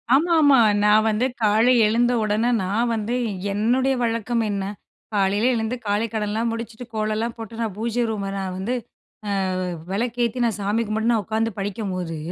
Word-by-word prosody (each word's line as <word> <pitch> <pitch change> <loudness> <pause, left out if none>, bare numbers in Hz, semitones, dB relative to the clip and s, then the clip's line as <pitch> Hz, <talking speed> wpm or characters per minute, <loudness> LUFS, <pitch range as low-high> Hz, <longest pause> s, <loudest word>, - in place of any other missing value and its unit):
ஆமாமா. 305 -3 +5 0.3
நான் 210 +1 +5
வந்து 215 +4 +1 0.2
காலை 220 +4 +4
எழுந்த 240 +3 +2
உடனே, 215 +3 +1
நான் 225 +6 0
வந்து 225 +2 -2 0.4
என்னுடைய 250 +6 +2
வழக்கம் 230 0 0
என்ன? 200 -1 -2 0.5
காலையில 205 +3 +2
எழுந்து 225 +1 -1
காலைக்கடன்லாம் 220 +1 -1
முடிச்சுட்டு, 230 +1 -6
கோலலாம் 215 +2 -1
போட்டு, 225 0 -8
நான் 215 -4 -2
பூஜை 235 +2 -1
ரூம 200 -3 -3
நான் 190 -1 -3
வந்து, 195 +7 -2 0.8
அ 185 - -2 0.3
விளக்கு 235 +4 -1
ஏத்தி, 235 +2 -3
நான் 225 -3 0
சாமி 205 +3 0
கும்பிட்டு 220 +2 0
நான் 220 -3 +1
உக்காந்து 225 +1 -1
படிக்கம்போது, 185 -4 -3
220 Hz, 150 wpm, -23 LUFS, 205-235 Hz, 0.8 s, ஆமாமா